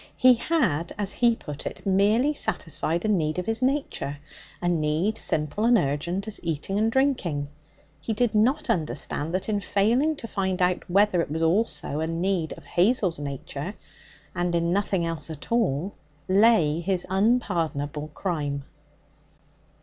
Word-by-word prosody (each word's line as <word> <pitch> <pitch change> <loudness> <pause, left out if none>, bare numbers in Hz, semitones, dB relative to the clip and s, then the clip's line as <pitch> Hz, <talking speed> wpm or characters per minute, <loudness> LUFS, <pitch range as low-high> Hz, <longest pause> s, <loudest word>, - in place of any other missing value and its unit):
He 255 0 +7
had, 230 - 0
as 205 -2 -1
he 235 -1 +3
put 150 -8 -7
it, - - -8
merely 210 +9 +3
satisfied 170 - -1
a - - +1
need 160 -7 +1
of 180 - -2
his 225 +4 -1
nature 260 - -1 0.4
a 175 - -2
need 170 +5 0
simple 155 +7 0
and 235 +1 +5
urgent 170 +6 -1
as 215 - -2
eating 165 +4 -2
and 220 +1 +2
drinking. 195 - 0 0.5
He 160 - -4
did 235 +1 +1
not 225 +6 +2
understand 150 0 -2
that 190 - -2
in 210 -2 0
failing 235 +11 +2
to 235 - -8
find 190 -3 -2
out 180 0 0
whether 195 -1 +3
it - - -4
was 160 +2 -2
also 160 -5 0
a 160 - -1
need 170 0 -1
of - - -13
Hazel's 185 -2 +2
nature 140 +5 -5 0.6
and 175 -1 -1
in 170 0 +1
nothing 195 -3 0
else 165 -2 -3
at 155 +5 -9
all 195 - +1 0.3
lay 190 -6 +4
his 180 +1 -1
unpardonable 170 - 0
crime. 145 -6 -2
180 Hz, 155 wpm, -25 LUFS, 160-220 Hz, 0.6 s, He